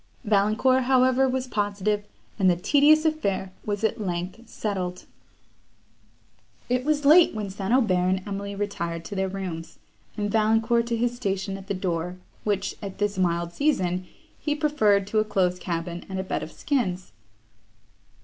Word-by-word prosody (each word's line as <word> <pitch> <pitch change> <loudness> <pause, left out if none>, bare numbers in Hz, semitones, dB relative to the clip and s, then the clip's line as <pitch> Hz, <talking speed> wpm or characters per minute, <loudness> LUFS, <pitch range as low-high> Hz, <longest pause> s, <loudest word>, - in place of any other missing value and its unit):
Valancourt, 220 +5 +3
however, 260 0 +4
was 260 0 -1
positive, 205 -2 -1 0.4
and 190 -2 +5
the 175 - +4
tedious 295 - +4
affair 200 -12 0 0.2
was 205 0 -2
at 220 0 0
length 185 +5 -4
settled. 185 -4 -3 1.6
It 250 0 +1
was 295 0 0
late 320 -2 +7
when 210 -3 -3
St. 195 +1 -4
Aubert 240 -6 +4 0.2
and 190 0 0
Emily 200 0 -4
retired 170 -5 -3
to 205 - -6
their 190 0 0
rooms, 185 -4 -6 0.4
and 205 -1 -1
Valancourt 225 +2 +2
to 235 -1 0
his 240 +1 0
station 195 -4 -2
at 195 0 -9
the 200 - -2
door, 180 -1 -2 0.3
which, 200 -2 -1
at 195 -2 -6
this 205 -2 -1
mild 170 -1 0
season, 185 - 0 0.3
he 295 -1 -1
preferred 270 -11 +2
to 215 +2 0
a - - +3
close 185 -4 0
cabin 170 0 -4
and 190 - -4
a - - -1
bed 190 - -2
of 160 - -7
skins. 190 - -2
205 Hz, 160 wpm, -25 LUFS, 185-240 Hz, 1.6 s, late